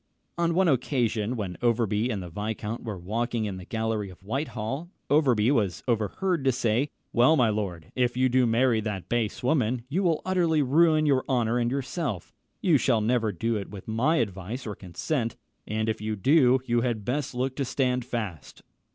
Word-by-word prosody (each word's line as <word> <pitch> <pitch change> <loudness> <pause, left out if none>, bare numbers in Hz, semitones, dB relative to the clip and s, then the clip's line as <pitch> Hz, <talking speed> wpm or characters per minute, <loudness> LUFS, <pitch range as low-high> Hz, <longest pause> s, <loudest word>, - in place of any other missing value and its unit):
On 170 -1 +1
one 190 0 +4
occasion, 120 -5 +1
when 95 -6 -4
Overbury 115 -1 +1
and 100 -6 -2
the 90 - -8
viscount 105 +3 -4
were 110 -4 -4
walking 110 +5 -2
in 100 -3 -4
the 90 - -9
gallery 110 -1 -2
of 95 +1 -15
Whitehall, 135 - -3 0.2
Overbury 130 -6 +4
was 100 - 0
overheard 130 - 0
to 135 - +4
say, 120 +2 +1 0.3
"Well, 125 +6 +5
my 125 -6 +3
lord, 95 -7 -3
if 125 -1 +1
you 130 0 +4
do 125 0 +3
marry 115 0 +3
that 100 -5 -4
base 120 -2 -1
woman, 125 -3 +1
you 175 +7 0
will 170 -5 +1
utterly 170 -5 +2
ruin 155 +3 +4
your 135 -3 +3
honour 120 -2 +1
and 120 0 +1
yourself. 135 - -3 0.3
You 165 -7 +4
shall 115 -2 +2
never 115 0 +1
do 115 +6 -1
it 100 - -6
with 100 -3 -10
my 120 +9 +2
advice 105 - -3
or 105 - -4
consent; 115 - -3 0.3
and 110 +1 -1
if 110 -2 -1
you 110 0 -2
do, 130 - +4
you 120 -1 +1
had 115 -4 -2
best 135 +1 -2
look 130 +1 -1
to 140 - 0
stand 125 -1 0
fast." 110 - -6
120 Hz, 185 wpm, -27 LUFS, 105-135 Hz, 0.3 s, Well